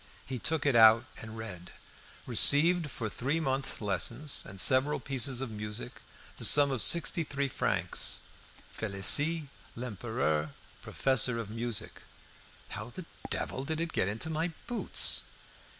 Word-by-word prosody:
He 130 -2 -6
took 160 +6 -2
it 140 -4 +2
out 110 +1 +6
and 110 0 -9
read 95 -6 -9 0.6
"Received, 165 +2 +5
for 115 -4 -5
three 135 +9 -2
months' 135 -5 -2
lessons 120 +7 -1
and 95 0 -8
several 130 +7 +3
pieces 130 -1 -1
of 135 -4 -5
music, 105 +3 -7 0.4
the - - -5
sum 145 -1 +5
of 130 -4 -1
sixty 165 - +3
three 140 -1 -3
francs. 130 - -1 0.5
Felicie 140 - +2 0.3
Lempereur, 110 - -3 0.3
professor 130 -2 0
of 110 -3 -6
music." 115 -1 -5 0.7
"How 110 +3 -7
the 175 +8 -10 0.2
devil 130 - -3
did 160 +3 -4
it 165 0 -4
get - - 0
into 110 +10 -3
my 160 +2 -1 0.2
boots?" 240 0 +3
130 Hz, 135 wpm, -29 LUFS, 110-145 Hz, 0.7 s, out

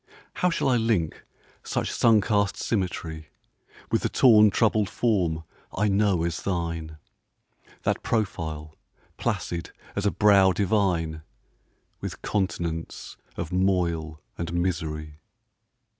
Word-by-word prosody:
How 180 - +3
shall 165 - 0
I 125 -2 +4
link 110 -9 0 0.4
such - - -2
sun 110 -3 +4
cast 100 -1 +1
symmetry 85 -6 -3 0.6
With - - +2
the - - 0
torn 110 -4 +6
troubled 105 0 +2
form 90 -10 0 0.3
I 105 +2 +2
know 100 -4 +2
as 85 -1 -2
thine, 85 -4 -3 0.9
That - - 0
profile, 80 -8 -2 0.4
placid 85 -1 -2 0.3
as 100 0 0
a - - +2
brow 100 -3 +5
divine, 90 -6 0 0.8
With - - -6
continents 85 -5 -3 0.2
of 80 - -4
moil 85 -4 0 0.2
and 85 0 -3
misery? 80 -4 -2
90 Hz, 115 wpm, -26 LUFS, 80-105 Hz, 0.9 s, torn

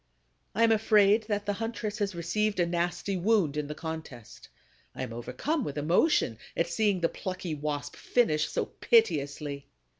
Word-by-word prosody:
I 230 - +3
am 230 - +5
afraid 215 0 +4
that 205 -2 -1
the 205 - 0
huntress 225 -1 -4
has 200 -3 -1
received 200 +5 -1
a 175 - +4
nasty 175 +3 -1
wound 185 -5 +2
in 150 -1 -2
the 150 - -5
contest. 160 -8 -8 0.5
I - - -4
am 115 - -5
overcome 130 - -2
with 145 - -5
emotion 150 - +2 0.2
at 170 - +2
seeing 200 0 +1
the 165 - +4
plucky 185 -1 -5
Wasp 145 -1 -4
finish 155 -11 +1
so - - -1
piteously. 145 - +1
175 Hz, 160 wpm, -29 LUFS, 150-215 Hz, 0.5 s, am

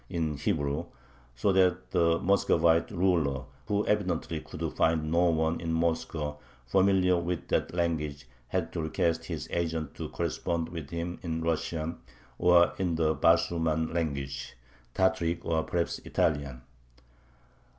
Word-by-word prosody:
in 80 -3 -1
Hebrew, 70 0 -1 0.5
so 65 +11 +2
that 90 -1 +2
the 85 -2 +3
Muscovite 85 -4 +3
ruler, 85 -8 +1 0.2
who 105 0 +1
evidently 90 -6 0
could - - -5
find 80 -1 +1
no 85 +2 +4
one 80 0 0
in 85 -1 -2
Moscow 80 -2 -1 0.3
familiar 95 +5 +3
with 85 0 -3
that - - 0
language, 75 -5 -1 0.2
had 80 +3 -2
to 85 - -2
request 80 +1 0
his - - -5
agent 80 -3 -2
to - - -6
correspond 85 -1 -2
with 80 -5 -7
him 85 +2 -4
in 80 -2 -3
Russian 80 0 -2 0.4
or 90 -1 +5
"in 90 -3 0
the 80 -1 +2
Basurman 80 -1 +2
language" 70 -5 -3 0.4
(Tataric 95 -3 +1
or 80 -1 +1
perhaps 85 +1 -2
Italian). 70 -5 -1
85 Hz, 130 wpm, -29 LUFS, 80-85 Hz, 0.5 s, or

